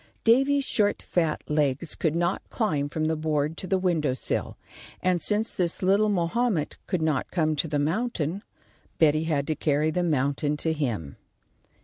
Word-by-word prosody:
Davy's 270 +5 +4
short 205 -5 +1
fat 165 -3 -1
legs 150 +1 +1
could 160 -2 -1
not 175 +2 0
climb 150 - -1
from 155 +1 -2
the 160 +1 +1
board 155 0 -1
to 185 - -5
the 190 - +2
window 165 -8 0
sill, - - -2 0.4
and 180 -2 +1
since 215 +1 +1
this 175 0 -1
little 200 +3 +3
Mahomet 195 -1 0
could 180 -4 -1
not 155 -5 0
come 155 -3 0
to 160 - 0
the 150 -1 -1
mountain, 170 +2 -1 0.6
Betty 155 0 +3
had 145 -4 0
to 155 - -1
carry 150 +1 +1
the 180 - 0
mountain 145 -2 0
to 160 +2 +1
him. 115 - -3
160 Hz, 165 wpm, -26 LUFS, 150-185 Hz, 0.6 s, Davy's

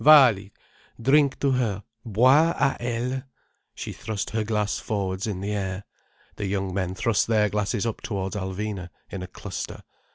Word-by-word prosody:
"Vaali, 125 -10 +7 0.5
drink 140 +3 +4
to 140 - +3
her—Boire 120 - +3
à 135 - +2
elle—" 120 +2 -1 0.5
She - - -5
thrust 105 -3 -4
her 110 0 0
glass 105 -1 0
forwards 95 -1 -2
in 95 -3 -3
the 100 +1 -2
air. 95 -1 -2 0.5
The 105 - -2
young 95 -1 -1
men 95 -1 -1
thrust 110 +1 +2
their 105 -2 +3
glasses 105 +2 0
up 115 - -2
towards 95 -2 -3
Alvina, 95 -1 -3 0.2
in 95 - -4
a 90 - -5
cluster. - - -6
105 Hz, 155 wpm, -26 LUFS, 95-120 Hz, 0.5 s, Vaali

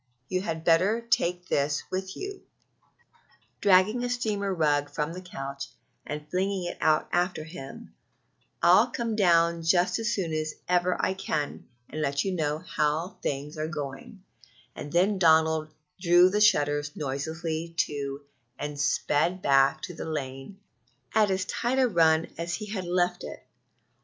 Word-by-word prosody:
you 185 0 0
had 160 -4 -4
better 185 +7 +3
take 185 -6 0
this 145 -2 0
with 190 0 -4
you," 395 0 -6 1.2
dragging 205 +5 +4
a 245 - -1
steamer 215 -5 -1
rug 145 -4 +1
from 150 +2 -3
the 180 - -7
couch, 140 -6 -6 0.4
and 150 0 -5
flinging 190 0 -1
it 175 - -4
out 155 -1 +3
after 175 -2 0
him, 155 -4 -9
"and - - -13 0.7
I'll 185 +7 +6
come 235 -2 -3
down 170 -4 +3
just 180 +3 +2
as 225 +1 -1
soon 175 -7 -2
as 155 0 -2
ever 180 0 +2
I 190 - +1
can 150 -6 -3 0.2
and 155 - -5
let 140 +1 0
you 195 - 0
know 150 -3 0
how 155 +1 -2
things 145 +3 -4
are 155 - -1
going 150 +5 -7 0.5
and 145 - -7
then 190 +3 +2
Donald 160 -2 +4 0.3
drew 175 +1 +5
the 210 +1 +1
shutters 145 -7 +3
noiselessly 160 +4 -4
to 140 -3 -2 0.3
and 145 0 -5
sped 150 +5 +1
back 135 -1 +3
to 180 - -5
the 160 - -6
lane 135 +4 -5 0.5
at 215 -2 +4
as 190 0 0
tight 240 +5 -1
a 260 -1 +4
run 165 -5 +3
as 170 0 -2
he 215 - -6
had 200 -3 -4
left 180 0 0
it. - - -9
170 Hz, 155 wpm, -27 LUFS, 150-190 Hz, 1.2 s, I'll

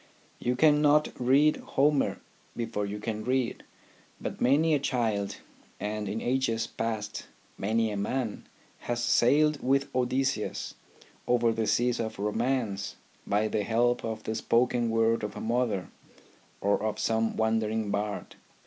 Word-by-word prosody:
You 125 +1 0
cannot 150 +1 +4
read 140 +5 +4
Homer 145 0 +1 0.4
before 105 -3 -2
you 100 +1 -4
can 110 0 -4
read; 125 0 -1 0.6
but - - -5
many 155 +5 +4
a 145 - +3
child, 110 -7 -1 0.4
and 105 -1 -3
in 110 - -2
ages 120 -3 0
past 110 -2 -4 0.3
many 110 +2 0
a 105 - -3
man, 110 +2 -3 0.3
has 120 0 -2
sailed 150 +5 +3
with 135 +2 +1
Odysseus 130 -2 -1 0.5
over 120 -1 +3
the 110 -1 -1
seas 120 0 +2
of 110 -1 -3
Romance 105 -1 -1 0.3
by 105 +2 +2
the 110 0 -1
help 120 +3 +1
of 110 -1 -4
the 110 - -2
spoken 120 +1 +1
word 115 0 +2
of 105 - -4
a - - -6
mother, 115 -5 -1 0.7
or 100 0 +2
of 105 0 -1
some 110 0 0
wandering 110 -1 0
bard. 105 0 -3
115 Hz, 140 wpm, -28 LUFS, 110-125 Hz, 0.7 s, cannot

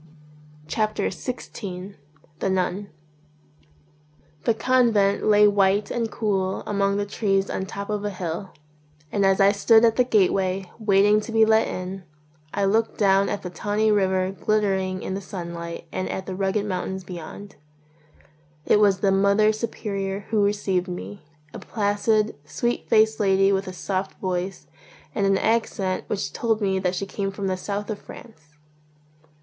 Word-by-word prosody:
63 215 +5 0
XVI 195 -4 -6 0.4
THE 195 - 0
NUN 190 +2 -1 1.6
THE 230 - +3
convent 225 -6 +2
lay 210 0 +6
white 200 0 +2
and 230 -2 -1
cool 195 -4 -1
among 200 -1 0
the 205 - -1
trees 195 -1 0
on - - -2
the 190 - -3
top 200 +1 -6
of 210 -1 -2
a 205 - -1
hill; 185 0 -5 0.6
and 200 - +1
as 195 0 +3
I 195 0 +6
stood 220 +3 +5
at 225 -1 +2
the 250 - +5
gateway, 195 -4 +1
waiting 205 0 +4
to 230 - -7
be 225 0 +5
let 220 0 +3
in, 185 +1 -5 0.5
I 200 - 0
looked 220 +3 +1
down 195 -1 +3
at 205 - -3
the 180 - -5
tawny 210 +4 0
river 190 -2 +2
glittering 195 -2 0
in - - -3
the 195 - -3
sunlight 170 -3 -6
and 185 - -3
at 190 - -4
the 190 - -5
rugged 195 +2 0
mountains 190 -1 -3
be 180 -1 -7
yond. 195 +4 -10 1.1
It - - +4
was 200 -3 +3
the 195 - +3
Mother 200 +2 +4
Superior 200 -3 -3
who 215 -2 +3
received 200 -3 0
me, 180 +2 -7 0.3
a - - -7
placid, 215 0 0
sweet 240 +10 -2
faced 220 0 +4
lady 195 -1 +3
with 195 0 0
a - - -4
soft 190 +1 -3
voice 185 0 -3 0.5
and 200 -3 +1
an 195 0 +3
accent 200 -4 0
which 200 -1 -3
told 225 -2 0
me 195 -2 0
that 185 -1 -1
she 195 - -2
came 195 0 -3
from 195 0 -5
the 190 -1 0
South 205 +3 -4
of 210 - -5
France. 155 -10 -14
200 Hz, 165 wpm, -24 LUFS, 190-210 Hz, 1.6 s, lay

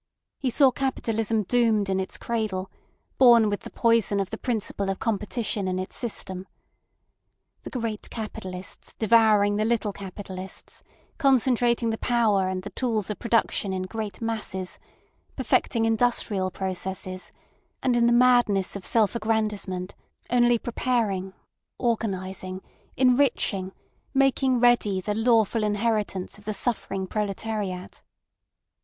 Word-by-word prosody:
He 265 - 0
saw 265 +2 +5
Capitalism 225 -4 -1
doomed 220 -2 +2
in 190 0 0
its 190 - -4
cradle, 215 -5 -3 0.5
born 235 -4 +7
with 205 - -1
the - - -10
poison 230 -3 +2
of 195 - -2
the 220 - -4
principle 210 -5 -2
of 195 - -1
competition 210 -2 -2
in 185 0 -1
its 185 0 -5
system. 190 -5 -4 1.1
The - - -8
great 230 -4 -4
capitalists 185 -4 -7
devouring 215 -2 +4
the 215 - +1
little 220 -2 0
capitalists, 190 -1 -8 0.4
concentrating 245 -4 +3
the 220 - -4
power 215 -6 +2
and 185 0 -3
the 205 - -7
tools 220 -5 -1
of 210 - -6
production 230 -4 +1
in 185 0 -2
great 210 +1 -5
masses, 210 -5 -3 0.6
perfecting 230 -2 +1
industrial 225 -4 +1
processes, 185 0 -4 0.5
and 250 -2 +2
in 235 0 +4
the - - +4
madness 240 -6 +4
of 200 - -6
self 220 0 +2
aggrandisement 210 -4 -1 0.4
only 240 -1 +4
preparing, 225 -6 -1 0.5
organising, 190 -5 -2 0.3
enriching, 250 -7 +2 0.4
making 270 -1 +3
ready 235 -5 +3
the 210 +3 -2
lawful 225 0 +2
inheritance 210 -2 -1
of 205 - -19
the 215 0 -3
suffering 195 -5 0
proletariat. 205 -2 -3
215 Hz, 125 wpm, -25 LUFS, 190-235 Hz, 1.1 s, born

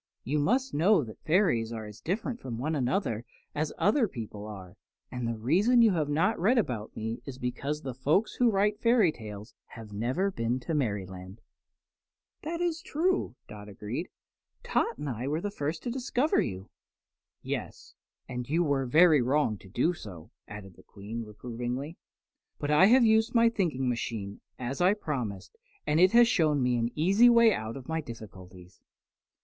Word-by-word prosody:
"You 150 +4 -1
must 255 - +1
know 175 +2 +4
that 110 -3 -11
fairies 155 - +2
are 110 -2 -5
as 105 0 -11
different 230 +7 -3
from 120 -3 -6
one 150 +7 -2
another 125 - -1 0.3
as 155 +1 -2
other 225 +3 +3
people 110 - -7
are, 95 -4 -10 0.4
and 125 -2 -3
the 115 -1 -3
reason 195 - +4
you 225 - +5
have 155 -5 0
not 165 +8 +1
read 220 +9 +3
about 120 - -2
me 115 +2 -4
is 130 -2 -7
because 140 +4 -3
the 130 - -4
folk 145 - +2
who 245 -1 +5
write 210 0 +1
fairy 230 -7 +4
tales 105 -3 -10
have 110 -3 -11
never 130 - -1
been 120 -5 -1
to 165 - -4
Merryland." 95 -7 -3 1.0
"That 335 +2 -4
is 340 -2 -1
true," 360 - -1
agreed 105 0 -6 0.6
Dot. - - -9
"Tot - - -7
and 145 +1 -5
I 125 0 -3
were 150 +3 0
the 205 +3 -4
first 155 -3 -4
to 240 - -3
discover 260 +3 +1
you." 95 -1 -5 0.7
"Yes, - - -6 0.3
and 125 -1 -5
you 165 +4 +2
were 140 -4 0
very 155 +1 +6
wrong 130 -2 +1
to 95 - -15
do 125 - +1
so," 95 - -11 0.2
added 100 -3 -10
the - - -15
Queen, 110 +4 -7
reprovingly. 120 +7 -6 0.6
"But 145 - -2
I 150 +6 +6
have 245 +2 +6
used 220 +2 +3
my 230 0 +6
thinking 165 - -1
machine, 115 -4 -3 0.2
as 130 +4 -4
I 185 +3 +4
promised, 125 - -5 0.3
and 150 - +2
it 185 +3 +5
has 240 0 +7
shown 155 - +2
me 125 0 +2
an 115 0 0
easy 195 +10 +5
way 235 -2 +6
out 110 -2 -4
of 130 - -11
my 160 0 -1
difficulties." 95 - -12
140 Hz, 175 wpm, -29 LUFS, -, 1.0 s, has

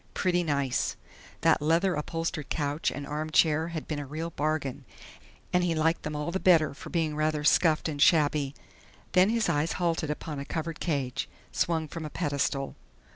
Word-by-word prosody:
Pretty 180 -2 +2
nice! 140 -6 0 0.5
That - - +4
leather 165 +5 +2
upholstered 160 -1 -3
couch 145 0 0
and 145 - -6
armchair 155 +1 +2
had 165 -2 -5
been 150 -2 -3
a 145 - -5
real 160 +4 -4
bargain, 145 -3 -2 0.7
and 180 0 +3
he 170 -2 +1
liked 160 +2 +1
them 150 0 -4
all 150 +3 -2
the 190 - -1
better 165 -6 +4
for - - -10
being 160 -3 0
rather 155 -1 0
scuffed 155 +1 +4
and 145 -2 -3
shabby. 145 -3 +3 0.6
Then 185 +2 +5
his 230 -1 +1
eyes 160 -1 +1
halted 165 -3 0
upon 150 -1 -4
a - - -3
covered 160 +1 -4
cage, 140 -7 -2 0.2
swung 160 -2 0
from 165 +2 -6
a 155 - -5
pedestal.... 140 -2 -1
155 Hz, 175 wpm, -28 LUFS, 145-165 Hz, 0.7 s, Then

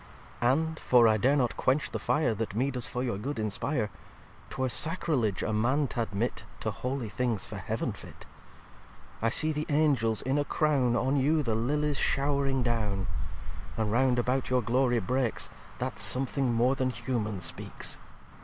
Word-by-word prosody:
xviii 120 - +3
"And 160 +4 0
(for 120 -2 +5
I 110 -1 +4
dare 130 +7 +3
not 125 -5 +1
quench 135 +4 +1
the - - -3
Fire 150 -6 +1
That 105 -2 -4
me 130 +5 +1
does 125 -2 -1
for 125 - -3
your 120 -6 -2
good 135 +5 -4
inspire) 110 +2 -1 0.6
'Twere 130 0 -1
Sacriledge 130 - +1
a 110 - -1
Man 130 +7 +2
t'admit 115 -1 -2 0.2
To 110 - -1
holy 125 +4 -3
things, 115 -2 -1
for - - -7
Heaven - - -2
fit. - - -11 1.0
I 115 - +2
see 155 +6 +3
the 150 0 -3
Angels 140 -8 +2
in 135 +3 +1
a - - +2
Crown 140 -5 +1
On 130 +4 +1
you 150 +3 +2
the 115 -4 0
Lillies 145 +5 0
show'ring 140 -2 +1
down: 105 -5 0 0.7
And 110 -2 0
round 125 +1 +3
about 125 +2 0
your 125 -1 +2
Glory 120 +2 +2
breaks, 125 +2 -1 0.3
That 125 -5 -3
something 130 +5 +1
more 120 +3 +3
than 130 -1 0
humane 110 -4 -2
speaks. 85 -1 -4
125 Hz, 170 wpm, -29 LUFS, 115-140 Hz, 1.0 s, for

